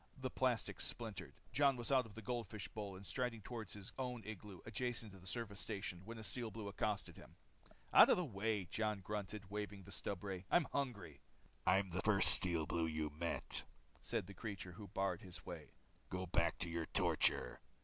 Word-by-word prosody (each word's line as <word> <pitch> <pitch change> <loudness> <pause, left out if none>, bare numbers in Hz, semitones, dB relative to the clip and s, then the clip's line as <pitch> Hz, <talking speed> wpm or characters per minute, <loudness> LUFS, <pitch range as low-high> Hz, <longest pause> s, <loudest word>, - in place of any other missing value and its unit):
The 130 -1 -3
plastic 125 -3 +1
splintered. 105 -7 -5 0.2
Jon 140 -2 +4
was 120 +2 -2
out 130 -3 +4
of 105 - -14
his 115 - -8
goldfish 115 -4 -3
bowl 105 -3 -5
and 95 +2 -10
striding 125 -1 -2
toward 115 -2 -5
his 100 -2 -8
own 125 -3 -2
igloo 105 -3 -7
adjacent 115 0 -2
to 95 - -12
the 90 - -13
service 100 -2 -3
station 95 -5 -4
when 115 +1 -6
a 110 - -7
Steel 115 +1 -3
Blue 110 -2 -6
accosted 100 +1 -2
him. - - -13 0.6
"Out - - +10
of - - +6
my 180 - +1
way," 105 - -1
grunted 105 +1 -2
Jon, 95 - -17
waving 105 -1 -4
the - - -12
stubray. 95 -1 -3
"I'm 175 -3 +5
hungry." 105 - -2 0.5
"I'm 95 +1 +4
the 95 +3 0
first 100 -2 +7
Steel 85 -3 +6
Blue 80 +2 0
you 80 -1 -1
met," 85 +3 +1 0.4
said - - -1
the 100 - -9
creature 100 -4 -5
who 100 +4 -9
barred 95 -1 -1
his 90 -2 -9
way. - - -8 0.3
"Go 95 0 -2
back 85 -1 +2
to 85 - 0
your 85 -1 -2
torture." 60 - +3
100 Hz, 190 wpm, -40 LUFS, 95-115 Hz, 0.6 s, Out